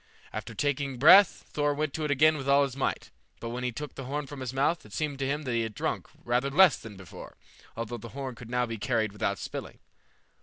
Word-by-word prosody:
After -, -, -6 dB
taking 140 Hz, -2 st, -1 dB
breath, 190 Hz, +10 st, +7 dB
Thor 145 Hz, -1 st, +1 dB
went 150 Hz, -1 st, -2 dB
to 160 Hz, -, -3 dB
it 150 Hz, -, -1 dB
again 155 Hz, +3 st, +4 dB
with 140 Hz, -2 st, -4 dB
all 140 Hz, +1 st, +6 dB
his 135 Hz, -2 st, -3 dB
might, 135 Hz, -, -2 dB, 0.3 s
but 115 Hz, -, -5 dB
when 125 Hz, +2 st, -4 dB
he 125 Hz, -, -1 dB
took 145 Hz, +6 st, -7 dB
the 135 Hz, -, -7 dB
horn 145 Hz, +3 st, -3 dB
from 140 Hz, 0 st, -9 dB
his 130 Hz, -2 st, -4 dB
mouth, 145 Hz, +5 st, +1 dB
it -, -, -15 dB
seemed 150 Hz, -3 st, -2 dB
to 135 Hz, -, -1 dB
him 145 Hz, +2 st, -2 dB
that 125 Hz, -4 st, -2 dB
he 115 Hz, -, +1 dB
had 110 Hz, -2 st, -4 dB
drunk -, -, -2 dB, 0.2 s
rather 125 Hz, +3 st, +1 dB
less 175 Hz, +2 st, +6 dB
than 105 Hz, -3 st, -11 dB
before, 95 Hz, -3 st, -11 dB, 0.4 s
although 115 Hz, +1 st, -4 dB
the 115 Hz, -, -9 dB
horn 135 Hz, -2 st, -4 dB
could 120 Hz, -1 st, -12 dB
now 125 Hz, 0 st, +1 dB
be 115 Hz, -2 st, -6 dB
carried 115 Hz, -2 st, 0 dB
without 100 Hz, -1 st, -1 dB
spilling. -, -, -7 dB
135 Hz, 240 wpm, -28 LUFS, 120-145 Hz, 0.4 s, breath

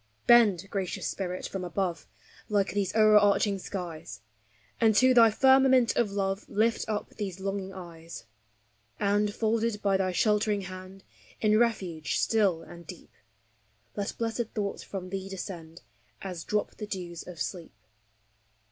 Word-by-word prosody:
Bend, 210 Hz, -7 st, +5 dB
Gracious 190 Hz, -3 st, -3 dB
Spirit, 185 Hz, -2 st, -3 dB
from 190 Hz, -2 st, -5 dB
above, 180 Hz, -1 st, -3 dB, 0.4 s
like 205 Hz, -2 st, +1 dB
these 200 Hz, -2 st, 0 dB
o'erarching 210 Hz, -2 st, +4 dB
skies, 175 Hz, -4 st, -7 dB, 0.6 s
And 220 Hz, -2 st, +4 dB
to 255 Hz, +3 st, +5 dB
thy 230 Hz, -2 st, +7 dB
firmament 265 Hz, 0 st, +4 dB
of 235 Hz, -3 st, +2 dB
love 195 Hz, 0 st, -2 dB
lift 220 Hz, +2 st, +1 dB
up 210 Hz, -1 st, -3 dB
these 195 Hz, -3 st, -5 dB
long 195 Hz, +1 st, -2 dB
ing 190 Hz, 0 st, -7 dB
eyes; 170 Hz, -7 st, -10 dB, 0.7 s
And, 205 Hz, 0 st, +2 dB
folded 225 Hz, 0 st, 0 dB
by 195 Hz, -1 st, +3 dB
thy 190 Hz, -1 st, 0 dB
sheltering 210 Hz, +1 st, +1 dB
hand, 185 Hz, +1 st, -9 dB, 0.4 s
in 215 Hz, 0 st, +3 dB
refuge 185 Hz, -9 st, 0 dB
still 195 Hz, -7 st, +2 dB
and 170 Hz, 0 st, -13 dB
deep, 180 Hz, -, -11 dB, 0.8 s
Let 200 Hz, -1 st, -4 dB
blessed 230 Hz, 0 st, -3 dB
thoughts 200 Hz, -2 st, -2 dB
from 185 Hz, -2 st, -7 dB
thee 195 Hz, 0 st, -4 dB
descend, 175 Hz, -4 st, -8 dB, 0.4 s
as 180 Hz, -4 st, -5 dB
drop 210 Hz, 0 st, -2 dB
the 210 Hz, -, -6 dB
dews 175 Hz, -4 st, -6 dB
of 175 Hz, -3 st, -9 dB
sleep. 170 Hz, -, -5 dB
200 Hz, 140 wpm, -28 LUFS, 185-215 Hz, 0.8 s, thy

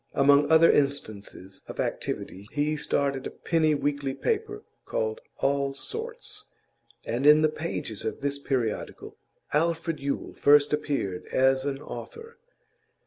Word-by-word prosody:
Among 145 Hz, +1 st, +5 dB
other 160 Hz, +1 st, +7 dB
instances 105 Hz, -9 st, -2 dB
of -, -, -9 dB
activity 100 Hz, +2 st, -3 dB
he 150 Hz, +1 st, 0 dB
started 140 Hz, -2 st, -1 dB
a -, -, -5 dB
penny 160 Hz, -3 st, +1 dB
weekly 140 Hz, -2 st, -1 dB
paper, 425 Hz, -1 st, -2 dB, 0.2 s
called 480 Hz, -2 st, -2 dB, 0.2 s
All 140 Hz, 0 st, 0 dB
Sorts, 450 Hz, -, -5 dB, 0.6 s
and 125 Hz, +5 st, 0 dB
in 150 Hz, +1 st, +8 dB
the 155 Hz, -, +5 dB
pages 155 Hz, -9 st, -4 dB
of 110 Hz, -, -4 dB
this 140 Hz, 0 st, -1 dB
periodical 125 Hz, -6 st, -3 dB, 0.4 s
Alfred 165 Hz, +1 st, 0 dB
Yule 140 Hz, 0 st, -3 dB
first 145 Hz, 0 st, +5 dB
appeared 140 Hz, -11 st, -2 dB
as 130 Hz, +1 st, +2 dB
an 135 Hz, -1 st, -2 dB
author. 460 Hz, -1 st, -9 dB
145 Hz, 130 wpm, -27 LUFS, 135-165 Hz, 0.6 s, in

